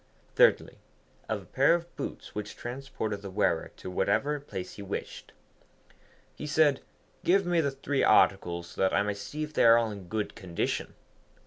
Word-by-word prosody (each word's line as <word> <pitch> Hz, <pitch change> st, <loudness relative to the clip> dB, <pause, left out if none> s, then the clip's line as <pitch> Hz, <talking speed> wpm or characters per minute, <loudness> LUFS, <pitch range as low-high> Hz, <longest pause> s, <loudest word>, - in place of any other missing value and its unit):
Thirdly, -, -, +3 dB, 0.5 s
of -, -, -2 dB
a -, -, -18 dB
pair 165 Hz, -, +4 dB
of 175 Hz, 0 st, -6 dB
boots 140 Hz, -, -6 dB
which 105 Hz, 0 st, -5 dB
transported 120 Hz, -5 st, -5 dB
the 100 Hz, -, -7 dB
wearer 95 Hz, -, 0 dB
to 95 Hz, -, -7 dB
whatever 135 Hz, +11 st, +1 dB
place 95 Hz, -10 st, -7 dB
he -, -, -9 dB
wished. 100 Hz, 0 st, -6 dB, 1.0 s
He 150 Hz, -, -7 dB
said, 150 Hz, -2 st, +3 dB, 0.4 s
'Give 195 Hz, +2 st, +3 dB
me 175 Hz, -1 st, +2 dB
the 140 Hz, -, +1 dB
three 135 Hz, +1 st, -1 dB
articles 85 Hz, -5 st, +3 dB
so -, -, -6 dB
that 95 Hz, -, +3 dB
I 100 Hz, -, +3 dB
may 105 Hz, 0 st, -1 dB
see 145 Hz, +10 st, -5 dB
if 155 Hz, 0 st, -6 dB
they -, -, +3 dB
are 115 Hz, 0 st, +8 dB
all 115 Hz, -2 st, +1 dB
in 100 Hz, -3 st, -9 dB
good 110 Hz, +2 st, -3 dB
condition.' 85 Hz, -3 st, -3 dB
115 Hz, 180 wpm, -29 LUFS, 100-150 Hz, 1.0 s, are